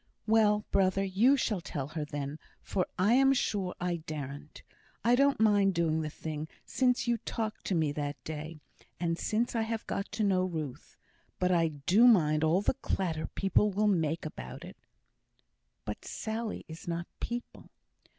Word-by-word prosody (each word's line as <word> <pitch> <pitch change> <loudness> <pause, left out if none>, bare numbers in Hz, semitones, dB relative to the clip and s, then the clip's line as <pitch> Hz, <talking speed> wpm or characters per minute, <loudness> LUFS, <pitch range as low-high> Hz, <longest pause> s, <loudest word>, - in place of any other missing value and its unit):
"Well, 215 -1 +3
brother, 195 0 +3
you 215 +9 +4
shall 215 -7 0
tell 145 -5 -4
her 155 0 -3
then, 145 0 -5 0.2
for 185 -3 -1
I 200 +5 +4
am 270 +1 +5
sure 200 -7 -1
I 175 -1 -1
daren't. 150 -2 -7 0.4
I 235 - +4
don't 275 +2 +4
mind 205 -3 +4
doing 160 -1 +1
the 155 - -3
thing, 155 0 -5 0.2
since 250 -2 +1
you 235 -1 +2
talked 220 -1 -4
to 190 - 0
me 155 -3 +2
that 145 0 -3
day, 155 +1 -6 0.4
and 170 -1 -1
since 230 +3 0
I've 225 0 -1
got 200 - -3
to 215 +1 0
know 190 -2 +3
Ruth; 160 -8 -5 0.4
but 180 0 +1
I 170 -2 +4
do 165 - +4
mind 155 -9 +4
all 170 +5 +3
the - - +2
clatter 170 -9 -2
people 195 +2 +2
will 205 +2 0
make 165 -6 +1
about 60 - -7
it." - - -11 1.1
"But 105 - -5
Sally 220 0 -4
is 160 +2 -10
not 170 0 -2
'people.'" 240 0 -6
185 Hz, 165 wpm, -30 LUFS, 155-220 Hz, 1.1 s, am